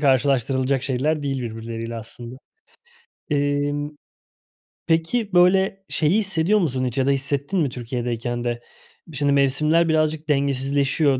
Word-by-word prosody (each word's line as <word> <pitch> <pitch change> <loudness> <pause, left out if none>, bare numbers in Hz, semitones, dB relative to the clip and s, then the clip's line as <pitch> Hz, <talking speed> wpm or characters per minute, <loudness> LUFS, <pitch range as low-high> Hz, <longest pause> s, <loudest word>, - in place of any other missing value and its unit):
karşılaştırılacak 135 -1 +2
şeyler 145 +4 0
değil 135 -2 -2
birbirleriyle 115 0 -5
aslında. 120 +2 -9 0.9
Emm, 145 0 0 1.0
peki, 175 +7 0
böyle, 190 +2 +3
şeyi 160 +5 +2
hissediyor 195 0 +2
musun 130 -7 0
hiç 125 0 -3
ya 130 - +2
da - - +4
hissettin 140 +6 -1
mi 145 - +1
Türkiye'deyken 120 -1 -3
de? 120 -1 -2 0.5
Bir 160 -4 -9
şimdi 145 0 +2
mevsimler 150 +5 +3
birazcık 155 0 0
dengesizleşiyor, 140 0 +1
140 Hz, 125 wpm, -22 LUFS, 130-155 Hz, 1.0 s, da